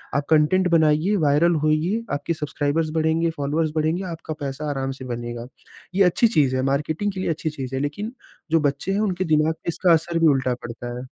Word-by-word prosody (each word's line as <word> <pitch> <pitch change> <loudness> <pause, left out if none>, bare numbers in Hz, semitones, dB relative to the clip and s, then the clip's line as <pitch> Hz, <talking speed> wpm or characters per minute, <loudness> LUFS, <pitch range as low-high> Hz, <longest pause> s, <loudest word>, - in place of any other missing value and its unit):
आप 140 0 0
कंटेंट 160 +4 +4
बनाइए, 160 +5 +2
वायरल 155 +4 +3
होईये, 170 +9 +1
आपके 145 +4 -1
सब्सक्राइबर्स 155 +1 -1
बढ़ेंगे, 160 +1 +1
फॉलोअर्स 150 +2 0
बढ़ेंगे, 160 +4 0
आपका 160 -1 -6
पैसा 145 +2 -4
आराम 135 -1 -2
से - - -6
बनेगा। 120 0 -6 0.5
ये 195 - +5
अच्छी 230 +7 +4
चीज़ 145 - +2
है, 130 - +1
मार्केटिंग 155 +8 -1
के 190 - -7
लिए 185 - -1
अच्छी 160 0 -1
चीज़ 135 -3 -6
है। 135 - -1
लेकिन 205 - -4 0.4
जो 165 - +4
बच्चे 145 +4 -1
हैं, 195 - 0
उनके 185 -4 0
दिमाग 155 +1 +3
में 160 - +1
इसका 170 +1 +3
असर 165 +1 +1
भी 165 - +5
उल्टा 130 -1 0
पड़ता 120 +1 -6
है। 125 - -7
155 Hz, 205 wpm, -23 LUFS, 140-170 Hz, 0.5 s, ये